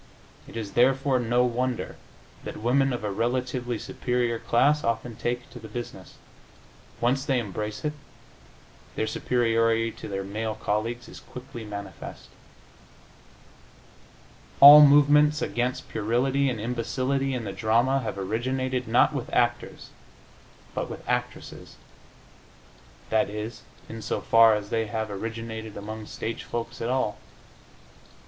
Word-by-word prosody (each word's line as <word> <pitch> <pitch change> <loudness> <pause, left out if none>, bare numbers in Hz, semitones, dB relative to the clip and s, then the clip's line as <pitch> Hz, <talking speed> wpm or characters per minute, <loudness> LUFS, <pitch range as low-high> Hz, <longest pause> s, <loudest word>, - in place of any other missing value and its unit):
It - - -9
is, 105 -3 -5
therefore, 135 +2 +3
no 120 +1 +2
wonder 125 0 -2 0.5
that - - -6
women 135 +4 +2
of 120 -3 -4
a 105 - -2
relatively 125 +2 -1
superior 120 0 -1
class 145 +7 +2
often 115 0 -2
take 120 +2 -3
to 120 - -10
the 110 - -10
business.... 115 -6 -8 0.8
Once 130 +3 +1
they 135 -2 +1
embrace 105 - -4
it, 150 - 0 1.0
their - - 0
superiority 115 -1 +1
to - - -9
their 95 -1 -3
male 110 +2 -3
colleagues 115 +4 -2
is - - -11
quickly 125 -2 -10
manifest. 100 -3 -8 2.3
All 145 +2 +12
movements 145 +1 +6
against 125 +1 -2
puerility 130 +6 +1
and 120 -4 -3
imbecility 130 +4 -1
in 120 - -3
the 100 -3 -5
drama 120 +5 +2
have 115 -5 -4
originated, 125 +5 -2
not - - +4
with - - -4
actors, - - -1 0.8
but - - -3
with - - -9
actresses - - -4 1.4
that 110 -2 +2
is, 105 +2 -6 0.3
in 115 0 -8
so - - -2
far 115 -1 +6
as 105 -1 -5
they 115 -1 0
have 110 -1 -3
originated 110 +1 -6
among 110 +1 -7
stage 115 0 -5
folks 120 -1 -5
at 115 - -1
all. 130 -5 0
120 Hz, 130 wpm, -26 LUFS, 110-130 Hz, 2.3 s, All